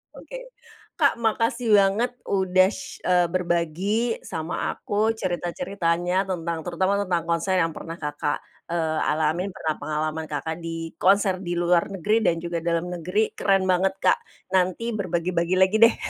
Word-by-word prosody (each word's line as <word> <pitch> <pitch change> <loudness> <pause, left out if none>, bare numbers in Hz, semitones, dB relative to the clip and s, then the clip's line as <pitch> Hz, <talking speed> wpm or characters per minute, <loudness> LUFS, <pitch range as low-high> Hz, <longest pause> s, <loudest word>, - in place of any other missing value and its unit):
Oke. - - -9 0.6
Kak, - - +3
makasih 230 +1 0
banget 200 +5 +2 0.2
udah 185 -1 +3
sh 280 +7 -8
eee, 180 -1 +4
berbagi 185 +6 0
sama 160 +2 -3
aku 210 +2 0
cerita-ceritanya 175 -1 -1 0.2
tentang 170 -2 -2
terutama 190 +3 +1
tentang 180 -4 0
konser 170 +3 +1
yang 165 -2 +1
pernah 165 +2 -7
Kakak, 145 -1 -2 0.3
eee, 160 -2 0
alami 160 +5 0
pernah 160 -4 -2
pengalaman 155 +1 -2
Kakak 160 +2 -3
di 165 -1 -5
konser 190 -1 +3
di 175 -2 -3
luar 175 0 +2
negeri 195 +3 +1
dan 175 -5 +2
juga 170 0 -3
dalam 170 0 0
negeri. 180 +6 -1
Keren 195 -1 +2
banget 190 +1 +2
Kak, - - +5 0.4
nanti 185 +3 +2
berbagi-bagi 180 -2 0
lagi 190 +3 +4
deh. 230 0 +7
180 Hz, 145 wpm, -24 LUFS, 165-195 Hz, 0.6 s, deh